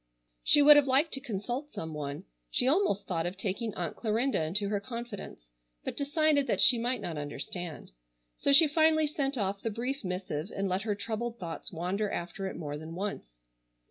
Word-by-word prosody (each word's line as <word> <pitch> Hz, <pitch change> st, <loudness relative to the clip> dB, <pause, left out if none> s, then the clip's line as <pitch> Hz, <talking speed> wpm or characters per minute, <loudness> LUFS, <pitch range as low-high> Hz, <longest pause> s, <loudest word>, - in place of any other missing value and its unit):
She 295 Hz, -, +6 dB
would 295 Hz, 0 st, +10 dB
have 290 Hz, -1 st, +4 dB
liked 275 Hz, +5 st, +3 dB
to 270 Hz, -, -2 dB
consult 240 Hz, +6 st, -4 dB
some 160 Hz, -, -6 dB
one. 145 Hz, -1 st, -5 dB, 0.3 s
She 250 Hz, -, +1 dB
almost 285 Hz, -, +2 dB
thought 170 Hz, -2 st, -1 dB
of 180 Hz, +2 st, -5 dB
taking 205 Hz, +3 st, -2 dB
Aunt 175 Hz, -2 st, -3 dB
Clarinda 230 Hz, +1 st, 0 dB
into 195 Hz, +6 st, 0 dB
her 205 Hz, -1 st, 0 dB
confidence, 225 Hz, -, -8 dB, 0.3 s
but -, -, -4 dB
decided 290 Hz, 0 st, +2 dB
that -, -, 0 dB
she 245 Hz, -3 st, +6 dB
might 240 Hz, 0 st, -1 dB
not 165 Hz, -6 st, -4 dB
understand. 155 Hz, -, -6 dB, 0.4 s
So -, -, +1 dB
she 305 Hz, +3 st, +8 dB
finally 315 Hz, +1 st, +4 dB
sent 280 Hz, -2 st, -1 dB
off 200 Hz, -2 st, -1 dB
the 225 Hz, -, -1 dB
brief 250 Hz, +5 st, -3 dB
missive, 180 Hz, -3 st, -3 dB
and 195 Hz, 0 st, -1 dB
let 185 Hz, +1 st, 0 dB
her 210 Hz, -1 st, -1 dB
troubled 230 Hz, +3 st, -4 dB
thoughts 170 Hz, -5 st, -6 dB
wander 185 Hz, +5 st, -1 dB
after 185 Hz, +2 st, -4 dB
it -, -, -5 dB
more 145 Hz, -2 st, -5 dB
than 160 Hz, +2 st, -8 dB
once. -, -, -5 dB
205 Hz, 190 wpm, -30 LUFS, 175-270 Hz, 0.4 s, would